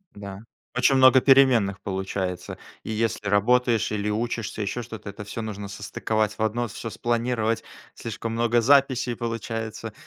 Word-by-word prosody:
Да. 100 -1 -8 0.4
Очень 130 +2 +4
много 130 0 +7
переменных 125 -8 +4
получается. 95 -2 -4 0.3
И - - -5
если 110 -1 -1
работаешь 115 +3 +2
или 105 0 -1
учишься, 115 0 -2
ещё 105 +4 -2
что-то, 110 -3 -8
это 100 +1 -8
всё 110 +3 -5
нужно 105 -2 -5
состыковать 105 +1 -2
в - - -6
одно, 115 +2 0
всё 115 +3 -6
спланировать. 115 -1 -1 0.3
Слишком 115 0 -5
много 120 +1 +2
записей 130 -1 +3
получается 115 -2 -4
115 Hz, 145 wpm, -25 LUFS, 105-120 Hz, 0.4 s, много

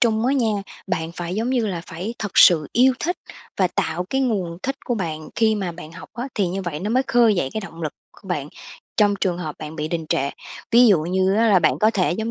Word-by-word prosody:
Trung 225 -1 +2
á 265 - +3
nha, 230 -5 +2 0.3
bạn 165 -3 -2
phải, 175 +1 -4
giống 225 +4 -1
như 245 -4 +1
là, 180 -4 -3
phải 185 +6 -5
thật 205 -4 -4
sự 155 -4 +7
yêu 255 +3 +5
thích 355 +3 -1 0.4
và 185 - +3
tạo 170 0 -2
cái 270 - +1
nguồn 190 -9 -1
thích 270 +1 -2
của 240 - -1
bạn 160 -6 -4
khi 220 -1 +3
mà 190 -4 -3
bạn 165 -1 -10
học 180 - -11
á, 245 +4 -4
thì 200 -3 +1
như 190 +2 -3
vậy 160 -4 -4
nó 210 +3 -2
mới 255 +3 +3
khơi 235 -4 +4
dậy 155 -7 0
cái 220 - -2
động 170 -4 -9
lực 155 - -2 0.3
của 190 - -13
bạn 150 -5 -2 0.5
trong 205 -1 +4
trường 180 -3 0
hợp 155 -4 -5
bạn 155 +1 -7
bị 155 -1 -3
đình 165 -1 -3
trệ. 140 +1 0 0.4
Ví 245 +1 +7
dụ 195 -7 +5
như 190 +3 +1
á 225 +1 +3
là 195 -3 +6
bạn - - +2
có 215 +1 +4
thể, 185 -5 +1
giống 220 +4 -3
190 Hz, 260 wpm, -22 LUFS, 170-225 Hz, 0.5 s, sự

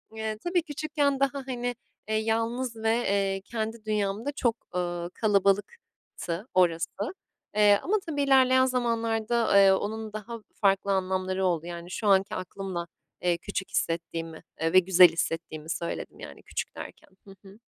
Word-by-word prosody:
Eee, 220 -1 -3
tabii, 350 0 +1
küçükken 290 -2 -1
daha, 275 0 0
hani, 245 -1 -2 0.3
eee, 220 - +1
yalnız 230 +3 -1
ve, 220 0 -1
eee, 195 -4 0
kendi 220 0 -4
dünyamda 210 +4 -1
çok, 235 -5 0 0.2
ııı, 175 -1 -2
kalabalıktı 200 - -1
orası. 170 -2 +3 0.7
Eee, 205 -1 +6
ama 405 - +1
tabii 300 -4 -2
ilerleyen 260 -1 +5
zamanlarda, 230 -3 +1
eee, 195 -1 +7
onun 215 +2 -2
daha 225 +2 -6 0.2
farklı 195 -1 +3
anlamları 190 0 0
oldu. 170 -2 0
Yani, 175 0 -7
şu 215 - -3
anki 195 0 +3
aklımla, 185 -2 -5 0.3
eee, 175 -1 +2
küçük 190 +1 -5
hissettiğimi, 165 -1 -3 0.2
eee, 165 +1 +1
ve 185 - +9
güzel 180 -1 +7
hissettiğimi 165 -1 -4
söyledim, 170 0 -4
yani - - -10
küçük - - -5
derken. - - -10 0.2
Hı 195 - -12
hı. 200 +3 -16
205 Hz, 145 wpm, -27 LUFS, 185-235 Hz, 0.7 s, ve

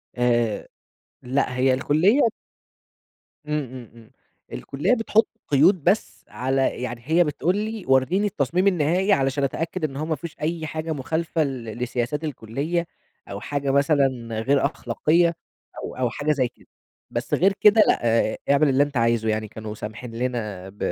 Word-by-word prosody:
آآ، 120 -3 +1 0.5
لأ 130 0 -1
هي 130 0 +3
الكُلّية 160 - +3 1.3
إمم، 150 0 -1
إمم، 125 -2 -10
إمم 115 -1 -17 0.4
الكُلّية 140 - -1
بتحط 225 -2 +2 0.2
قيود 150 +4 +4
بس 210 - 0
على 130 0 -1
يعني 120 -2 -4
هي 165 +4 +4
بتقول 165 +4 0
لي 215 0 -3
ورّيني 135 +10 +3
التصميم 180 +1 0
النهائي، 180 +3 +2
علشان 135 -2 +1
أتأكد 165 +5 -2
إن 140 -3 -2
هو 155 - -2
ما 160 0 -1
فيهوش 165 +2 -8
أي 160 +1 -2
حاجة 160 +1 -4
مخالفة 160 +3 -1
ل 135 -4 -4
لسياسات 125 +4 -2
الكُلّية، 150 +5 -3 0.4
أو 100 - -5
حاجة 140 +3 -2
مثلًا 135 -5 +1
غير 135 +4 +2
أخلاقية، 165 +8 +1 0.5
أو - - -6
أو 125 -2 0
حاجة 145 +6 -1
زي 135 -4 +1
كده، 120 - -21 0.4
بس - - -4
غير 195 +3 +4
كده، 215 +1 +7
لأ - - +3 0.5
اعمل 140 +1 +4
اللي 135 +1 +4
أنت 145 -2 -4
عايزُه 115 -1 +2
يعني 110 0 -1
كانوا 110 0 -7
سامحين 110 +2 -7
لنا 110 -6 -3
ب 100 - -18
140 Hz, 155 wpm, -23 LUFS, 125-165 Hz, 1.3 s, كده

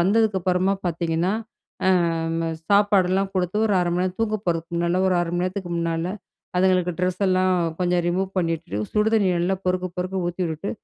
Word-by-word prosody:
வந்ததுக்கப்புறமா 190 -1 +2
பார்த்தீங்கன்னா, 170 +1 0 0.5
அ 190 - +5 0.8
சாப்பாடுல்லாம் 195 -2 +3
குடுத்து 185 +2 0
1` 205 -3 +2
1/2 175 -1 0
மணி 180 - +1
நேரம் 185 +2 -4
தூங்க 215 -1 +1
போறதுக்கு 165 0 -1
முன்னால, 170 +2 +1
1 185 - +2
1/2 170 -1 -2
மணி 175 - 0
நேரத்துக்கு 185 -1 -4
முன்னால, 165 0 -1 0.5
அதுங்களுக்கு 180 -1 +3
டிரஸ் 185 +1 -1
எல்லாம் 185 0 +3 0.3
கொஞ்சம் 180 -1 +2
ரிமூவ் 185 +2 0
பண்ணிட்டு, 165 - -2 0.2
சுடு 210 +1 +3
தண்ணி 200 -4 +3
நல்லா 185 +3 +1
பொறுக்கப் 180 -1 -1
பொறுக்க 185 0 -2
ஊத்தி 175 +1 -3
விட்டு, 160 +6 -4
185 Hz, 165 wpm, -23 LUFS, 175-190 Hz, 0.8 s, அ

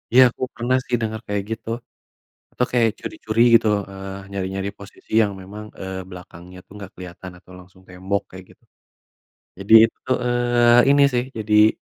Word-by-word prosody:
Ya, 130 - +9
aku - - -20
pernah 125 +2 0
sih 125 - 0
denger 110 0 -3
kayak 100 -1 -2
gitu, 115 - -9 0.8
atau 125 - 0
kayak 115 -2 +3
curi-curi 110 +1 -4
gitu, 115 -1 +5 0.2
eee, 95 0 -8
nyari-nyari 95 0 -3
posisi 100 - -15
yang 100 -1 -1
memang, 105 +3 -9 0.2
eee, 95 0 -5
belakangnya 90 0 -12
tuh - - -17
nggak 100 +1 -10
keliatan 90 0 -10
atau 90 - -18
langsung 90 +1 -18
tembok 95 +2 -3
kayak 95 0 -11
gitu. - - -36 0.9
Jadi - - +2
itu 130 - -15
eee, 120 0 +3
ini 140 0 +5
sih 120 0 0
jadi 105 0 +4
100 Hz, 160 wpm, -21 LUFS, 95-120 Hz, 0.9 s, Ya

